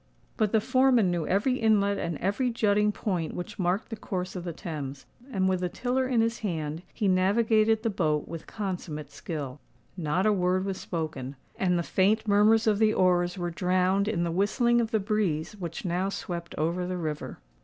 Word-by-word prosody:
But 215 -2 +1
the 220 - +4
foreman 250 -4 +3
knew 170 -3 -1
every 230 +7 +2
inlet 200 -3 +3
and 170 -2 -2
every 205 - 0
jutting 210 -2 +2
point 180 -6 -2
which 180 +4 -6
marked 185 +3 0
the 225 - -4
course 185 -3 -4
of 180 - -4
the 175 - -4
Thames; 145 -5 -6 0.3
and, 190 -5 +1
with 185 -1 +1
the 180 0 -1
tiller 255 +5 -1
in 245 -3 +2
his 230 0 0
hand, 160 -5 -3
he 210 - -1
navigated 215 +4 +3
the 225 - +1
boat 155 -6 0
with 165 -1 -7
consummate 175 -8 -5
skill. 145 -5 -6 0.4
Not 175 +2 0
a 215 - +4
word 185 0 +1
was 195 -1 -3
spoken; 155 -6 -4 0.2
and 180 -2 +1
the 170 - 0
faint 210 +6 +2
murmurs 210 +2 +4
of 210 -2 +2
the 215 -1 +3
oars 180 0 +2
were 175 -1 -2
drowned 185 +3 +1
in 195 -6 0
the 170 - -1
whistling 235 +6 +2
of 225 - -1
the 220 -2 +1
breeze 200 -4 -1
which 170 +2 -5
now 180 +2 0
swept 170 -3 -5
over 170 +4 -1
the 185 0 -3
river. 155 -3 -4
185 Hz, 195 wpm, -28 LUFS, 170-215 Hz, 0.4 s, the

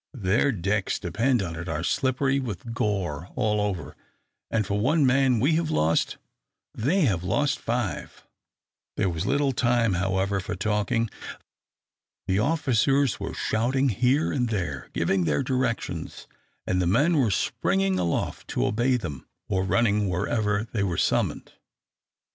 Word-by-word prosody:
Their 110 +5 +2
decks, 100 -1 -1
depend 115 +5 0
upon 85 -3 -4
it, 85 +2 -6
are 80 +1 -2
slippery 135 +3 +1
with 115 -2 -5
gore 95 -7 -2
all 105 -4 +1
over, 95 -8 -3 0.5
and 110 -2 0
for 100 +2 -1
one 145 +7 +3
man 130 -2 +3
we 140 +8 +3
have 165 -2 -1
lost, 80 - +1 0.6
they 155 - +1
have 100 - +1
lost 145 - 0
five." 120 -4 -3 0.7
There 95 - +1
was 80 -1 -3
little 140 -1 +2
time, 120 -4 +2
however, 95 +2 0
for 90 - -4
talking. 105 +4 0 1.2
The 95 +1 +1
officers 135 -1 +2
were - - -5
shouting 130 +5 +1
here 125 +8 +2
and 125 -3 0
there, 85 - -3
giving 90 +2 +1
their 75 -3 +1
directions, 130 -3 -2 0.4
and 90 0 0
the 90 - +1
men 145 - +3
were 125 -6 +3
springing 95 0 0
aloft 85 -2 -2
to - - -1
obey 125 +4 +2
them, 75 - -7 0.2
or 95 -1 +1
running 105 0 +2
wherever 105 +3 0
they 105 - -1
were 90 -4 -1
summoned. - - 0
105 Hz, 145 wpm, -26 LUFS, 95-130 Hz, 1.2 s, one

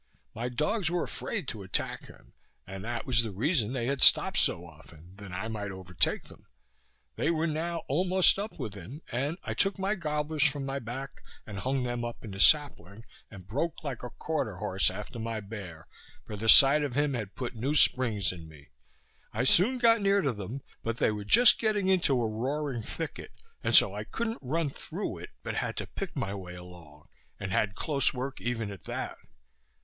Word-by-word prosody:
My 120 +3 -4
dogs 155 - -1
were 175 0 -1
afraid 195 - -4
to 110 - -6
attack 95 -1 -3
him, - - -17 0.3
and 95 0 -8
that 120 +1 -4
was 120 -3 +3
the 115 - -3
reason 115 - 0
they 125 -3 -2
had 135 +1 -2
stop'd - - +8
so 85 - +2
often, 80 +2 -16
that 100 -2 -10
I 100 +5 -4
might 105 -2 -4
overtake 95 -2 -1
them. - - -17 0.7
They - - 0
were 165 -1 0
now 165 +2 -2
almost 185 +6 +3
up 210 +2 -5
with 105 - -5
him, 110 - -10
and 140 +7 -2
I - - -3
took 195 0 +1
my 195 +2 0
goblers 150 -4 -3
from 140 -1 +2
my 135 0 -3
back 135 +3 -7 0.2
and 100 -2 -7
hung 130 +3 -1
them 120 -1 -3
up 120 0 -6
in 105 - -7
a 95 - -8
sapling, 115 - +3 0.2
and 95 -4 -12
broke 150 +11 -3
like 135 -5 -5
a 125 - -6
quarter 135 - -3
horse 95 +1 +1
after 105 +5 -7
my 115 0 -3
bear, 100 -6 -9 0.4
for 105 - -7
the 110 +2 -2
sight 140 +6 +8
of 135 -4 -3
him 145 0 +1
had 110 -6 -5
put 125 - -5
new 130 +6 -2
springs 115 -9 +3
in 85 -3 -10
me. 75 -3 -16 0.6
I 115 +3 -1
soon 195 - +5
got 230 -2 +4
near 200 -1 +3
to 135 -4 0
them, 110 +6 -7 0.2
but 115 0 -3
they - - +2
were 105 -1 -5
just 240 - +7
getting 210 -4 +1
into 170 -9 +3
a 115 - 0
roaring 130 +3 -3
thicket, 160 +8 -7 0.3
and - - +2
so - - +8
I - - -5
couldn't 230 0 -3
run 150 +4 -1
through - - -6
it, - - -9
but - - -4
had - - -3
to - - -3
pick - - -7
my 100 - -3
way 90 -3 -8
along, 85 -4 -14 0.3
and 95 -2 -5
had 100 +1 0
close 140 0 0
work 130 +2 -5
even 115 -3 -3
at 100 - -11
that. - - -5
120 Hz, 200 wpm, -29 LUFS, 100-150 Hz, 0.7 s, stop'd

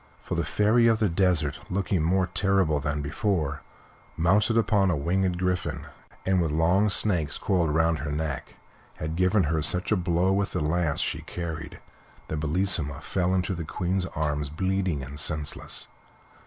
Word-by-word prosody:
For - - -5
the - - 0
Fairy 115 +3 +3
of 115 -1 +4
the 110 -2 +1
Desert, 85 -5 +1
looking 95 -2 0
more 90 +4 +2
terrible 95 -4 +1
than 75 +1 -2
before, 75 -2 -1 0.6
mounted 100 +7 +3
upon 105 -4 +3
a 85 - +1
winged 90 +4 0
griffin, 90 0 -2 0.4
and 95 -1 +3
with 85 - 0
long 85 +7 +3
snakes 90 -8 +1
coiled 90 -4 +1
round 80 +1 +2
her 75 - -3
neck, 75 -2 -4 0.4
had 80 +1 -4
given 90 +3 +3
her 80 0 0
such 90 +6 0
a - - +5
blow 90 0 +1
with 100 0 0
the 90 - 0
lance 80 -1 0
she - - -2
carried 80 -4 -6 0.5
that 80 - -2
Bellissima 80 -2 0
fell 95 0 0
into 95 +1 0
the 85 -2 -4
Queen's 90 +3 -2
arms 75 -3 -2
bleeding 95 -2 -1
and 70 +3 -8
senseless. 75 0 -3
85 Hz, 165 wpm, -26 LUFS, 75-95 Hz, 0.6 s, a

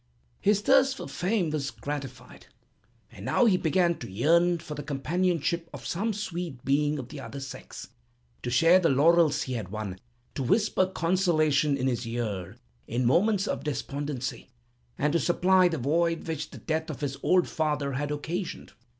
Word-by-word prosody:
"His 205 0 +2
thirst 270 +3 +4
for - - -6
fame 180 -3 -1
was 145 -3 -2
gratified, 140 -3 -7 0.6
and 100 -4 -11
now 245 - +3
he 210 -5 +5
began 175 0 +1
to 115 - -7
yearn 170 - +3
for 155 -2 -8
the 145 - -5
companionship 165 +3 -1
of - - -9
some 210 +6 -1
sweet 175 - -5
being 145 +2 +2
of 130 -3 -7
the 150 - -8
other 140 +1 -7
sex, 135 -1 -9 0.5
to - - -3
share 165 +9 +5
the 170 -3 +2
laurels 160 +3 +4
he 130 - -4
had 110 -6 -4
won, 100 -3 -5 0.3
to - - -4
whisper 195 - +2
consolation 160 -6 +2
in 130 - -2
his 125 -2 -1
ear 110 -4 -4 0.3
in 120 +2 -1
moments 195 - +3
of - - -2
despondency, 140 -3 -4 0.5
and 150 +1 +1
to 170 - +3
supply 185 +2 +4
the 165 -2 -2
void 165 +6 0
which 155 -2 -3
the - - -11
death 160 0 -2
of 155 - -6
his 140 -1 -3
old 180 -1 +3
father 150 -3 -1
had 145 +2 -2
occasioned. 165 +5 -4
155 Hz, 170 wpm, -27 LUFS, 135-175 Hz, 0.6 s, he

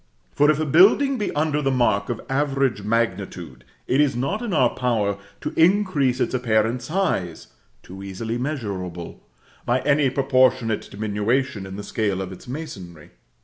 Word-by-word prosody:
For 145 +1 +3
if 155 -1 +3
a 155 - 0
building 210 - +5
be 210 - -1
under 150 0 +1
the 135 - +1
mark 120 -6 +1
of 120 - -3
average 135 -4 0
magnitude, 100 - -2 0.2
it 135 - +2
is 140 -4 +2
not 140 - -2
in 235 -4 -3
our 130 -8 +3
power 105 -5 -1 0.2
to - - -4
increase 165 -8 +3
its - - 0
apparent 115 -1 +1
size 150 - -2 0.3
(too 95 +2 -10
easily 110 +5 -4
measurable) 100 - -5 0.4
by 125 +1 +1
any 145 -1 +3
proportionate 130 -4 +1
diminution 105 +2 -1
in 95 - -8
the 105 - -6
scale 100 -3 -1
of 95 -1 -5
its 95 - -12
masonry. 95 - -8
125 Hz, 155 wpm, -23 LUFS, 100-145 Hz, 0.4 s, building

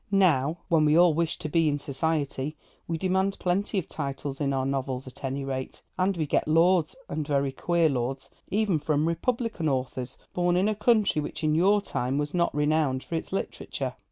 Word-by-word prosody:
Now, 165 -6 +3
when 160 -3 +3
we 150 +1 +4
all 175 -2 +6
wish 165 +1 0
to 155 - -5
be 160 +1 +2
in 145 - 0
society, 145 0 -2 0.3
we 165 - -1
demand 190 +2 0
plenty 195 +3 0
of 185 - -1
titles 140 -1 -4
in 140 -1 +1
our 135 -1 0
novels, 135 -1 -2
at 130 - -12
any 135 +1 -2
rate, 130 -1 -5
and 185 0 +1
we 160 - 0
get 145 - 0
lords 165 +1 +3
(and 150 -1 -3
very 140 -2 +1
queer 170 +4 +2
lords) 135 0 -2 0.2
even 200 -5 +1
from 150 +1 +1
Republican 225 -1 -1
authors, 130 -1 -3 0.2
born 175 0 +2
in 190 +3 +3
a 215 - +2
country 210 -6 +2
which 150 - -6
in 155 0 +2
your 195 +5 +4
time 130 -7 -2
was 145 0 -2
not 175 -1 +2
renowned 150 -3 +1
for - - -9
its 165 - -3
literature. 195 - -3
155 Hz, 195 wpm, -27 LUFS, 140-180 Hz, 0.3 s, all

